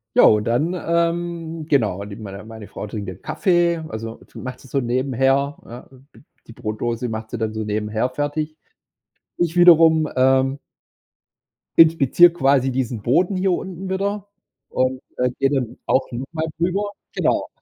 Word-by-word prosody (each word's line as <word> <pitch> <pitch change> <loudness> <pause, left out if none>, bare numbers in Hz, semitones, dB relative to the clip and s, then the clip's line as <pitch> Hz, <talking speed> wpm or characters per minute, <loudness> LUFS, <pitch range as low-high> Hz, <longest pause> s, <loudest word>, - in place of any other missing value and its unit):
Ja, - - +7
und 105 -1 +5
dann, 125 +10 0
ähm, 170 -2 -2
genau, 105 -8 +1
mit 100 +2 -9
meiner 100 -1 -8
meine 110 -1 -10
Frau - - -7
trinkt 105 -1 -6
'nen 95 0 -8
Kaffee, 175 -2 +1
also 115 -1 -7 0.2
macht 130 0 -7
sie 135 - -15
so 135 +1 -1
nebenher, 135 +3 +1
ne? 120 +2 -11 0.3
D - - -18 0.3
die - - -11
Brotdose 115 +3 -3
macht 110 -1 -5
sie 120 - -5
dann 110 -1 -2
so 110 0 -3
nebenher 105 +3 -1
fertig. 145 +3 -3 0.8
Ich 175 -1 0
wiederum, 165 -3 +6
ähm 130 +1 +2 1.2
inspiziere 165 +1 +6
quasi 135 -4 +2
diesen 125 -3 -2
Boden 175 - +2
hier 185 +1 +1
unten 185 +1 -4
wieder 200 +1 -2 0.4
und, 130 0 0 0.2
äh, 125 0 +2
gehe 135 - +3
dann 130 -4 -2
auch 130 - +2
noch 125 +2 -4
mal 160 0 -1
rüber. 195 +4 0 0.2
Genau. - - 0
135 Hz, 155 wpm, -21 LUFS, 115-165 Hz, 1.2 s, Ja